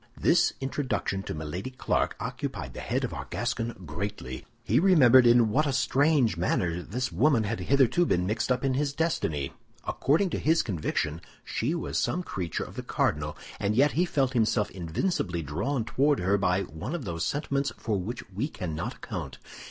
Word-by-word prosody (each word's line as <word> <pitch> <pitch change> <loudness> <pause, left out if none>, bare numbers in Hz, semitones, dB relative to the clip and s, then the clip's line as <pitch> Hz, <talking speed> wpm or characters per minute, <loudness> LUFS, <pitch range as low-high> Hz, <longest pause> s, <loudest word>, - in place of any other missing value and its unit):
This - - +4
introduction 135 -7 -2
to 95 - -5
Milady 80 +9 -4
Clarik 130 - 0
occupied - - -4
the - - -7
head - - -1
of - - -2
our - - -5
Gascon 115 -5 -3
greatly. 75 -5 -5 0.2
He - - +3
remembered 130 -9 +7
in 120 -1 +6
what 150 +8 +2
a - - +1
strange 140 - +3
manner 85 0 0
this 125 +8 -3
woman 120 - +3
had 110 +2 -2
hitherto 140 +5 +3
been 90 0 +1
mixed 110 +5 -1
up 125 +1 +1
in 135 - +2
his 140 +1 0
destiny. 80 - -1 0.3
According 170 +7 +1
to - - -1
his 160 +2 +3
conviction, 80 -4 -2 0.2
she 140 +9 -1
was 170 - -2
some 180 - 0
creature 90 - -3
of - - -11
the - - -2
cardinal, 75 0 -1 0.2
and 100 +1 0
yet 140 +5 +5
he 175 +4 +2
felt 135 -6 0
himself 110 -3 +2
invincibly 90 - -2
drawn 110 - -2
toward 140 +4 +2
her 95 +3 +2
by 95 -1 +1
one 80 - -5
of 155 -8 -5
those 85 -2 -3
sentiments 140 -2 -1
for 110 - -1
which 115 +7 -5
we 105 +9 -2
cannot 85 - -4
account. - - -6
115 Hz, 180 wpm, -28 LUFS, 90-140 Hz, 0.3 s, remembered